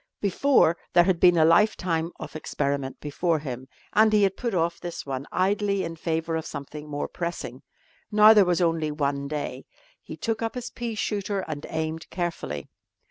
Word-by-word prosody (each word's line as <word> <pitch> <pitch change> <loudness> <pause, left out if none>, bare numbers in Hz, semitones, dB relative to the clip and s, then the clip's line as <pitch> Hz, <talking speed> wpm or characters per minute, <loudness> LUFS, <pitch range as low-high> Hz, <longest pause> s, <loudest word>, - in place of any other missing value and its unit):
Before 200 - +3 0.2
there 175 - +7
had 180 -1 +1
been 175 -1 +6
a 160 - +6
lifetime 170 -2 +3
of - - -8
experiment 140 -3 -2
before 160 +3 0
him, 130 -3 -6 0.3
and 220 0 +5
he 210 -1 +4
had 195 -1 +2
put 235 -5 -2
off 170 0 0
this 175 -1 -6
one 135 0 -4
idly 200 +1 +1
in 165 -1 -4
favour 165 0 -2
of 160 - -3
something 150 +2 -7
more 145 0 -3
pressing. 170 -7 -5 0.5
Now 215 +1 +8
there 210 -2 +7
was 180 -1 +1
only 165 -2 +1
one 140 -2 -1
day. 150 0 -4 0.4
He - - -9
took 225 -1 -2
up 225 +1 -2
his 245 -1 -5
pea 235 -2 -4
shooter 205 -1 -2
and 155 -4 -6
aimed 160 0 -3
carefully. 165 - -4
170 Hz, 180 wpm, -26 LUFS, 150-200 Hz, 0.5 s, Now